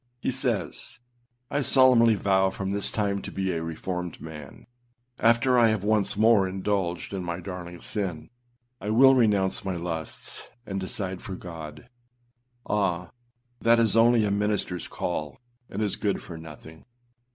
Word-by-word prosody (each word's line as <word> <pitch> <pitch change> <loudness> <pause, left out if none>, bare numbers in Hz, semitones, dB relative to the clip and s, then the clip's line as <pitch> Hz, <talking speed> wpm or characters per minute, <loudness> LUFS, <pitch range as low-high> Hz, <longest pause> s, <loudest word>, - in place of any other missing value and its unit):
He 130 - -1
says, 125 -4 -2 0.5
âI 145 0 0
solemnly 125 -4 +6
vow 95 -1 +2
from 95 0 -4
this 100 0 -1
time 100 -2 -1
to - - -7
be 95 -1 -1
a 85 -2 -2
reformed 90 +2 -4
man. 75 -4 -10 0.5
After 120 +2 +4
I 115 - +6
have 110 -3 0
once 105 -2 +2
more 110 -3 +5
indulged 95 -2 -2
in 95 -2 -3
my 85 0 -3
darling 90 -1 -7
sin, 95 -2 -4 0.5
I 105 - -5
will 135 +5 +7
renounce 105 -6 +2
my 95 -2 -2
lusts, 85 -2 -5 0.2
and 95 -2 -3
decide 95 0 -4
for 95 - -6
God.â 80 -1 -9 0.8
Ah! 90 -4 0 0.5
that 115 +1 +4
is 115 -2 +3
only 115 -1 +5
a 100 - 0
ministerâs 100 -3 -1
call, 75 -3 -4 0.3
and 105 +3 -2
is 105 - -1
good 100 -3 -1
for 85 - -9
nothing. 80 0 -11
95 Hz, 150 wpm, -26 LUFS, 90-110 Hz, 0.8 s, will